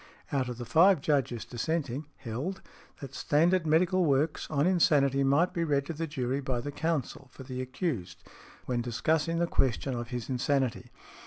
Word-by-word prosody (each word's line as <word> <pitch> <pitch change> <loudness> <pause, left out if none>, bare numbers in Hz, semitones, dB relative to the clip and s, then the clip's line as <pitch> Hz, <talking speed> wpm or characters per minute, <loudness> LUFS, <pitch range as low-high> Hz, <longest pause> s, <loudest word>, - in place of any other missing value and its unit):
out 130 -3 0
of 120 - -5
the 120 - -6
five 170 +8 +5
Judges 135 -5 0
dissenting,) 140 +2 -3
held, 135 - -5 0.4
that 135 -2 -8
standard 165 +5 +2
medical 180 +4 +3
works 150 0 +1
on 145 -1 +1
insanity 140 -7 +3
might 145 +7 +3
be 170 -3 0
read 140 -3 +1
to 165 - -4
the 165 +1 -3
jury 135 -3 -2
by 130 -2 -2
the 145 +4 -5
counsel 145 -3 -2
for 135 - -11
the 130 -1 -5
accused, 130 - -4 0.4
when 125 -1 -1
|104| - - 0
discussing 155 +7 0
the 170 - +2
question 135 -4 0
of 120 -1 -4
his 120 -1 -5
insanity. 130 -1 -1
140 Hz, 175 wpm, -29 LUFS, 125-165 Hz, 0.4 s, five